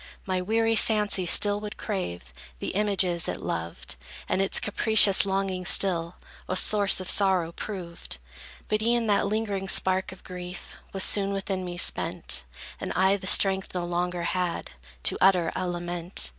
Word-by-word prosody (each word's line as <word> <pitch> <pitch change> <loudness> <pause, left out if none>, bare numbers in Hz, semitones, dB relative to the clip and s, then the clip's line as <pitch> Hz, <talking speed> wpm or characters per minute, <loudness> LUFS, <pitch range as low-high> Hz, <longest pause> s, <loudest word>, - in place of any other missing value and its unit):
My 185 -1 -2
weary 225 +4 0
fancy 210 -4 +1
still 205 +3 +5
would 210 0 -8
crave 85 - -6 0.2
The - - -5
images 190 -4 0
it - - -3
loved, 85 -5 -5 0.3
And 190 - -1
its 195 - +4
capricious 205 -2 +3
longings 190 -2 -1
still 170 -3 +2 0.3
A 185 - -2
source 200 0 +3
of 185 - -7
sorrow 190 -5 +4
proved. 170 - -8 0.5
But 215 0 -1
e'en 235 +1 0
that 205 -1 +1
lingering 205 -2 -3
spark 190 +1 +2
of 190 - -14
grief 180 0 -9 0.2
Was 195 -1 +1
soon 200 -1 +4
within 195 -1 -4
me 175 -1 -7
spent, 60 - 0 0.3
And - - -6
I 190 +2 +2
the 190 -2 -3
strength 190 -1 +4
no 175 -1 -3
longer 175 0 -3
had 180 0 -3 0.3
To - - +1
utter 180 -3 +3
a 185 - -3
lament. 175 - -2
190 Hz, 155 wpm, -25 LUFS, 175-205 Hz, 0.5 s, still